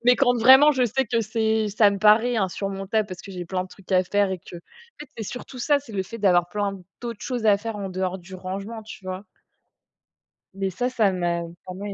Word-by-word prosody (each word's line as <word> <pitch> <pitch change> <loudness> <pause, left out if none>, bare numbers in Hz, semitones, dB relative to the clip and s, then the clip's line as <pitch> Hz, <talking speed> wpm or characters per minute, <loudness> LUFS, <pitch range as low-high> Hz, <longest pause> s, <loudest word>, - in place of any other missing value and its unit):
Mais 245 0 +6
quand 245 -3 +3
vraiment 265 +6 +8
je 260 -3 +2
sais 265 +4 0
que 230 +1 +1
c'est 220 0 0
ça 205 0 +4
me 200 - -3
paraît 220 +4 +4
insurmontable 195 +1 -1
parce 185 -1 -8
que 200 - -10
j'ai 180 -1 -5
plein 185 +1 -2
de - - -13
trucs 195 0 -17
à 185 0 +5
faire 200 +1 +1
et 190 - -3
que 180 - -13
en - - -7 0.4
fait, 295 - -9
c'est 225 - -4
surtout 250 +3 -8
ça, 290 +2 +3
c'est 255 -6 -13
le 190 -2 -1
fait 230 +5 -9
d'avoir 175 -4 +3
plein 200 -1 -2 0.2
d'autres 235 -3 -6
choses 245 -3 -3
à 205 -1 +6
faire 225 +1 -5
en 200 -2 -4
dehors 185 0 -2
du 185 +1 -12
rangement, 195 +5 -6
tu 205 - -11
vois? 185 +2 -5 1.3
Mais 195 0 -2
ça, 245 +7 -2
ça 220 -6 +2
m'a 175 -2 -1 0.2
pas 185 - -7
mal 200 +2 -6
205 Hz, 235 wpm, -24 LUFS, 190-230 Hz, 1.3 s, vraiment